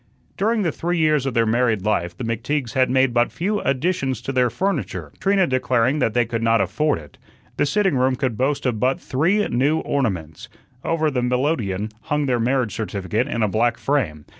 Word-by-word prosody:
During 215 +2 +1
the 170 - +1
three 175 +4 -2
years 155 -4 +2
of 130 - -3
their 115 -1 +3
married 110 -3 +1
life 85 -5 -1
the - - -5
McTeagues 120 +3 -2
had 130 -1 +2
made 130 -1 +2
but 120 0 +2
few 205 +4 -1
additions 135 - -1
to - - -3
their 125 -2 +2
furniture, 190 - -3
Trina 195 -1 +3
declaring 130 0 +1
that 115 -5 0
they 120 -1 +3
could 115 0 -3
not 115 0 +3
afford 115 - +1
it. 75 -3 -14 0.4
The - - +2
sitting 190 +1 +1
room 130 0 +2
could 130 -3 -2
boast 140 +4 -1
of 120 -4 0
but 130 +3 +1
three 180 +10 +1
new 140 +6 +2
ornaments. 90 - -3 0.3
Over 160 -2 0
the 125 -2 -1
melodeon 125 - -1
hung 150 0 0
their 125 -3 +1
marriage 125 -2 0
certificate 105 +1 -2
in 115 - -1
a - - +3
black 115 +4 +1
frame. 95 - -1
130 Hz, 195 wpm, -22 LUFS, 115-150 Hz, 0.4 s, their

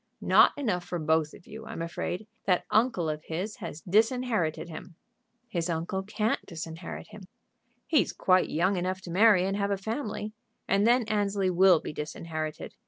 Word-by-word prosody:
"Not - - +5
enough 205 -11 -1
for 175 - -4
both 160 -1 +1
of - - -17
you, 220 +1 -10
I'm 165 - -5
afraid. 175 +4 -4 0.2
That 180 -2 +2
uncle 215 -7 +2
of 155 0 -4
his 185 +6 -4
has 150 - -7
disinherited 220 -5 +1
him." 165 +1 -9 0.5
"His 175 -6 -2
uncle 170 +3 -2
can't 210 +3 -1
disinherit 165 0 -7
him." 210 -3 -11 0.6
"He's 305 - +2
quite 185 0 +2
young 185 +5 +1
enough 185 +1 -2
to 175 - -8
marry 195 0 +5
and 195 +1 -1
have 200 0 0
a 200 - 0
family, 215 0 -4 0.3
and 200 +3 +3
then 245 +1 +4
Annesley 205 -3 0
will 180 -1 +6
be - - -7
disinherited. 155 0 -5
185 Hz, 170 wpm, -28 LUFS, 165-210 Hz, 0.6 s, will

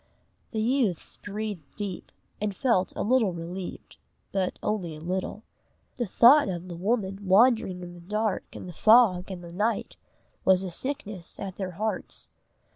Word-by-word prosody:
The 220 - -2
youths 230 - 0
breathed 205 -7 -6
deep, 200 -3 -5 0.3
and 205 -2 -1
felt 230 -8 +2
a - - -1
little 225 -4 +3
relieved, 175 +2 -7 0.3
but 190 -2 -1
only 185 -7 -2
a - - -9
little. 185 +5 -3 0.5
The 240 -3 -1
thought 245 +5 +6
of 180 0 -5
the 175 - -5
woman 195 +1 -1
wandering 195 -3 +4
in 175 0 -8
the 175 - -12
dark 210 +2 -1
and - - -7
the 180 - -8
fog 215 -3 +5
and 180 -2 -6
the 170 0 -10
night, 215 +5 -1 0.5
was 190 0 +4
a 185 - -4
sickness 210 -5 -4
at 190 -2 -6
their 185 -2 -4
hearts. 215 +5 -4
195 Hz, 160 wpm, -27 LUFS, 180-220 Hz, 0.5 s, thought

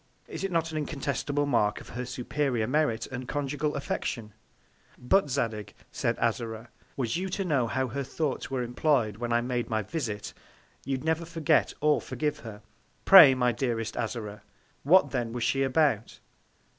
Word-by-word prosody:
Is - - -6
it 195 - -2
not 165 -1 0
an 155 - -2
incontestable 145 0 -2
Mark 105 -7 +1
of - - -13
her 125 +1 -5
superior 125 -1 -1
Merit 125 -4 0
and 130 -1 -7
Conjugal 145 +2 -2
Affection? 115 -5 -4 0.6
But, 150 +6 +2
Zadig, 115 -6 -2 0.2
said 115 - -1
Azora, 115 0 -2 0.3
was 125 +1 -1
you 190 +2 -3
to 195 +1 -2
know 140 -8 +1
how 130 +2 -1
her 140 +5 -3
Thoughts 140 +1 -3
were 130 -2 -2
employ'd 120 -3 +1
when 120 0 -3
I 120 0 +3
made 125 0 -2
my 110 -1 0
Visit, 110 - -4 0.5
you'd 135 -1 -2
never 160 +1 0
forget 165 -2 +1
or 150 0 +3
forgive 150 -1 -3
her. 110 -5 -10 0.4
Pray, 155 -9 +10
my 125 -1 +2
dearest 115 -2 -2
Azora, 110 -3 -4 0.4
what 185 +7 +5
then 120 -4 -2
was 120 -1 -3
she 135 - +1
about? 135 -5 +1
130 Hz, 165 wpm, -28 LUFS, 115-150 Hz, 0.6 s, Pray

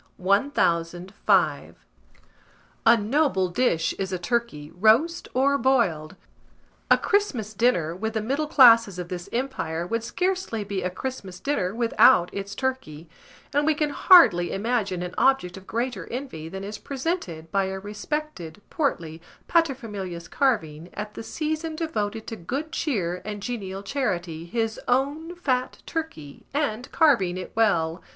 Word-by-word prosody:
] - - -40
1005. 185 -3 +1 1.1
A 235 - +8
noble 220 - +1
dish 175 -5 +1
is 190 -1 -2
a 185 - -1
turkey, 175 -7 -2
roast 230 - +3
or 280 +2 +3
boiled. 195 - +1 0.7
A - - +7
Christmas 285 - 0
dinner, 190 -8 +1
with 220 +4 -3
the 220 - 0
middle 280 +6 -1
classes 230 - +6
of 175 -1 -6
this 175 -1 -6
empire, 175 -10 -2
would 230 +5 -2
scarcely 365 - -2
be 200 -1 -3
a 180 - -1
Christmas 190 -3 -6
dinner 210 -8 -1
without 230 -6 +4
its 200 0 -5
turkey; 260 - -4 0.5
and 290 +1 +2
we 310 0 +2
can 295 0 0
hardly 245 - +6
imagine 200 -4 -1
an 180 0 -6
object 265 -10 +2
of 190 0 -12
greater 235 -6 -3
envy 235 - -6
than 190 +2 -7
is 205 +1 -6
presented 260 - -4
by 195 -1 +2
a 190 0 -4
respected 210 - -5
portly 165 - -2 0.3
pater 330 -5 +3
familias 195 -8 -7
carving, 170 - -1
at 210 0 -5
the - - -7
season 315 +5 -3
devoted 225 -10 -3
to 225 - -5
good 270 - -5
cheer 185 - -2
and 210 -1 -6
genial 195 -5 -5
charity, 180 - -3
his 225 +2 -2
own 285 +7 0
fat 255 -7 -2
turkey, 160 - -6
and 265 -5 -2
carving 235 - +3
it 185 - -7
well. 175 -6 +1
220 Hz, 145 wpm, -25 LUFS, 180-270 Hz, 1.1 s, A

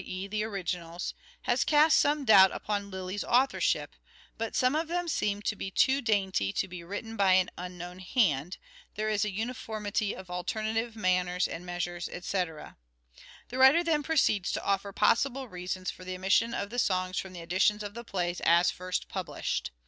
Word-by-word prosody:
e. 185 +1 -5
the 210 +1 -2
originals) 180 -4 -4 0.3
has - - +2
cast 305 +1 +5
some 290 -1 +2
doubt 195 -4 +8
upon 205 -1 -3
Lyly's 190 +1 -4
authorship: 260 +3 +1 0.4
but 225 0 -4
some 255 +1 +3
of 315 +2 0
them 350 +1 -2
seem 205 -9 -1
too 220 +7 +1
dainty 190 - +1
to 190 - -1
be 180 -1 -8
written 205 +5 -6
by 195 -3 +4
an 185 -1 +3
unknown 180 0 -7
hand, 180 - +1 0.4
there 215 0 -1
is 210 -2 +1
a 210 - 0
uniformity 215 -1 -3
of 190 - -10
alternative 220 +5 -2
manners 180 -3 +1
and 180 +2 -7
measures 175 0 -3
etc." 175 -3 -4 0.7
The 255 - -5
writer 270 +6 +7
then 320 -3 +1
proceeds 275 - +1
to - - -3
offer 200 0 0
possible 260 +6 +2
reasons 185 -1 -4
for 185 - -13
the 185 0 -5
omission 195 +5 +2
of 200 +1 -3
the 245 - -2
songs 185 -3 0
from 190 -1 -7
the 175 - -8
editions 190 +5 +1
of 205 0 -6
the 235 +2 -7
plays 175 -5 -2
as 170 +1 +5
first 180 0 -4
published. - - -3
200 Hz, 170 wpm, -29 LUFS, 180-225 Hz, 0.7 s, doubt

